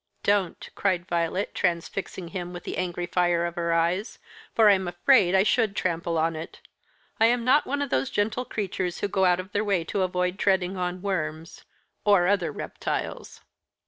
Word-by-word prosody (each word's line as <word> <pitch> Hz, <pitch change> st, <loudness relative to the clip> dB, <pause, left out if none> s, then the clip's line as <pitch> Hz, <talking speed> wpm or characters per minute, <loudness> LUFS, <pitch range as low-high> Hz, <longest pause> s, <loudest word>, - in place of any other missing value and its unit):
"Don't," 200 Hz, -4 st, 0 dB
cried 185 Hz, -3 st, 0 dB
Violet, 175 Hz, +2 st, -1 dB
transfixing 175 Hz, +1 st, -2 dB
him 180 Hz, -1 st, -5 dB
with 175 Hz, -, -8 dB
the -, -, -5 dB
angry 175 Hz, -1 st, -2 dB
fire 175 Hz, -1 st, +1 dB
of 170 Hz, -, -3 dB
her 170 Hz, -1 st, -1 dB
eyes, 170 Hz, +6 st, 0 dB, 0.4 s
"for 220 Hz, -2 st, +6 dB
I'm 190 Hz, -3 st, +4 dB
afraid 180 Hz, +2 st, +4 dB
I 190 Hz, -, +5 dB
should 215 Hz, -2 st, +1 dB
trample 170 Hz, -2 st, -1 dB
on 160 Hz, +1 st, +1 dB
it. 160 Hz, +1 st, -8 dB, 0.6 s
I 225 Hz, -, +6 dB
am 235 Hz, 0 st, +1 dB
not 275 Hz, +4 st, +4 dB
one 285 Hz, +2 st, -1 dB
of 280 Hz, -, -6 dB
those 130 Hz, +1 st, +1 dB
gentle 220 Hz, +4 st, -1 dB
creatures 190 Hz, -5 st, -3 dB
who -, -, +1 dB
go 190 Hz, -1 st, +1 dB
out 180 Hz, 0 st, +3 dB
of 185 Hz, +2 st, -7 dB
their 205 Hz, +1 st, 0 dB
way 195 Hz, -5 st, +1 dB
to 195 Hz, +4 st, -2 dB
avoid 180 Hz, 0 st, -1 dB
treading 190 Hz, -1 st, +1 dB
on 180 Hz, 0 st, -3 dB
worms 165 Hz, -4 st, -4 dB, 0.4 s
or 200 Hz, -4 st, +4 dB
other 195 Hz, -2 st, +1 dB
reptiles." -, -, -5 dB
185 Hz, 180 wpm, -26 LUFS, 175-200 Hz, 0.6 s, for